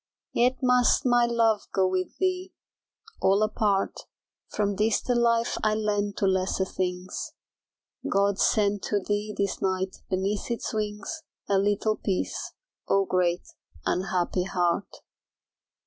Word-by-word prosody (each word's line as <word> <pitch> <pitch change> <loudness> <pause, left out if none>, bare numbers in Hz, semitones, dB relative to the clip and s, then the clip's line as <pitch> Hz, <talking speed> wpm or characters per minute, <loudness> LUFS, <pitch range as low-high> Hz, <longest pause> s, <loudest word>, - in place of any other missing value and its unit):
Yet 255 +3 +2
must 250 +2 +4
my 245 -1 +4
love 230 -3 +2
go 190 -1 +4
with 185 0 -2
thee 370 0 -1 0.7
all 200 +2 +4
apart 210 -2 +1 0.5
From 205 -1 -1
this 215 +2 +2
the 250 - -1
life 235 -1 +2
I 215 0 +3
lend 205 -1 -1
to - - +1
lesser 190 0 +1
things; 180 -1 -4 0.8
God 200 0 +2
send 205 -2 +2
to 205 - +2
thee 205 +2 -2
this 200 0 -1
night 190 0 -1
beneath 195 +4 -1
its 235 0 -3
wings, 210 +8 -3 0.3
A 195 -1 +3
little 205 +2 +1
peace, 190 -3 -2 0.4
Oh, 195 0 +3
great 180 -1 +1 0.4
unhappy 180 0 0
heart. 175 +1 0
205 Hz, 130 wpm, -27 LUFS, 190-220 Hz, 0.8 s, must